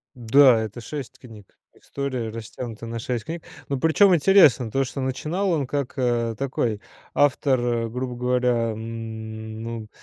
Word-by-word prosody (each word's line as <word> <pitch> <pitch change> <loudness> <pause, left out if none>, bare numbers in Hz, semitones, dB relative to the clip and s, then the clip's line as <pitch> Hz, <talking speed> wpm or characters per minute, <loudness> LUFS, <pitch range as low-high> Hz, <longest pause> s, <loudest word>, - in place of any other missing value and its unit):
Да, 125 0 +5
это 110 +2 -6
6 130 +1 -7
книг, 110 -6 -15 0.2
история 130 -5 -4
растянута 115 +1 -7
на 115 0 -5
6 120 -1 -3
книг, 165 0 -6 0.3
но, 140 -2 -1
причём, 180 +4 +5
интересно 150 - +5
то, 135 +4 +1
что 130 +3 -5
начинал 155 +9 -1
он 150 -6 0
как, 140 -1 -3
э, 120 -3 0
такой 120 -6 -1 0.3
автор, 120 -5 +2
грубо 125 +2 -4
говоря, 125 -2 +1
ну, 110 0 -6
125 Hz, 140 wpm, -24 LUFS, 115-140 Hz, 0.3 s, Да